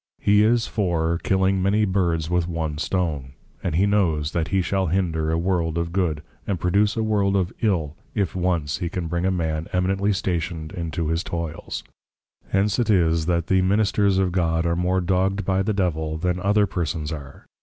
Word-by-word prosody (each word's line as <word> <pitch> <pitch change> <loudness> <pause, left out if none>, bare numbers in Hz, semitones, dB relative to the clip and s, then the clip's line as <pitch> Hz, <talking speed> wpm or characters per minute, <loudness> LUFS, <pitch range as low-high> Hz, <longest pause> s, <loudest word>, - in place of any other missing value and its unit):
He 105 +1 +4
is 115 +1 +3
for, 85 -5 0
Killing 95 0 +1
many 105 +3 +2
Birds 85 -5 0
with 90 0 0
one 80 -3 -3
stone; 75 -8 -2 0.3
and 85 -4 -1
he 95 +4 +4
knows 85 -8 +1
that 80 -2 -1
he 95 +2 +1
shall 95 0 0
hinder 80 -3 0
a 80 - +1
world 85 -2 0
of 85 0 -2
Good, 85 -5 -1 0.2
and 95 -4 -1
produce 100 +5 +2
a 110 - +1
world 100 -2 +1
of 95 -2 0
Ill, 85 -9 0 0.2
if 100 -4 -1
once 85 -5 0
he 90 -3 -2
can 90 -1 -3
bring 85 +2 -1
a - - +3
Man 80 -3 -2
Eminently 95 +3 +1
Stationed 85 -4 -2
into 85 -3 -3
his 80 +2 0
Toyls. 85 -4 -5 0.6
Hence 100 +1 +1
'tis 85 -9 +2
that 85 -2 +1
the 95 0 +3
Ministers 100 0 +2
of 95 -2 +2
God, 85 -2 +1
are 85 0 +1
more 90 +2 +1
dogg'd 95 +2 0
by 95 0 +1
the 95 - 0
Devil, 80 -6 -1
than 90 +2 -1
other 100 +2 +3
persons 80 -4 -3
are. 70 -3 -8
90 Hz, 185 wpm, -23 LUFS, 80-95 Hz, 0.6 s, He